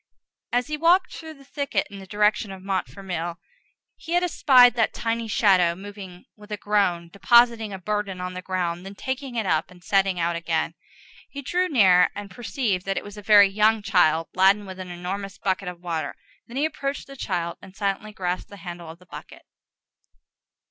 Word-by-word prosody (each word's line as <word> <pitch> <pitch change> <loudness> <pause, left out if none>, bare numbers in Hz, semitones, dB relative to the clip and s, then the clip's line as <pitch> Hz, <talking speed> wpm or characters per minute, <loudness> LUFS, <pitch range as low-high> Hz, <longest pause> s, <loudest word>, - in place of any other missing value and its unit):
As 245 +1 +1
he 305 0 -4
walked 350 +4 +3
through 320 -1 -9
the 275 - -17
thicket 280 -8 -2
in 200 - -9
the 190 - -11
direction 210 +1 +1
of 190 -1 -10
Montfermeil, 175 -1 -3 0.6
he 330 - -7
had 350 +1 +3
espied 255 -7 +6
that 230 -2 0
tiny 230 0 -2
shadow 185 -6 +3
moving 190 -2 -10
with 210 0 -16
a 210 - -2
groan, 195 -5 0
depositing 235 +1 +4
a 195 - -5
burden 200 0 -3
on 180 0 -4
the 185 - -6
ground, 180 -2 -2
then 195 +1 -9
taking 260 +2 -5
it 225 -3 -1
up 160 -3 0
and 180 -1 -17
setting 195 -2 +1
out 170 0 0
again. 170 - -1 0.6
He 280 0 -8
drew 360 +6 0
near, 185 -9 +5
and 205 -1 -7
perceived 220 -3 -2
that 195 - -1
it - - -2
was 205 0 -10
a 210 - -9
very 205 -1 +7
young 215 +2 +2
child, 165 -5 +2
laden 195 +2 +4
with 190 -1 -9
an 185 -1 -7
enormous 190 +3 -5
bucket 195 -1 -2
of 180 -1 -7
water. 165 -4 -3 0.3
Then 240 - -8
he 290 - +2
approached 280 -2 -3
the 275 - -12
child, 175 -8 -3
and 190 0 -14
silently 200 +1 -2
grasped 180 -3 -3
the 200 - -11
handle 175 -2 -8
of 165 - -10
the 180 - -20
bucket. - - -11
200 Hz, 195 wpm, -24 LUFS, 180-225 Hz, 0.6 s, very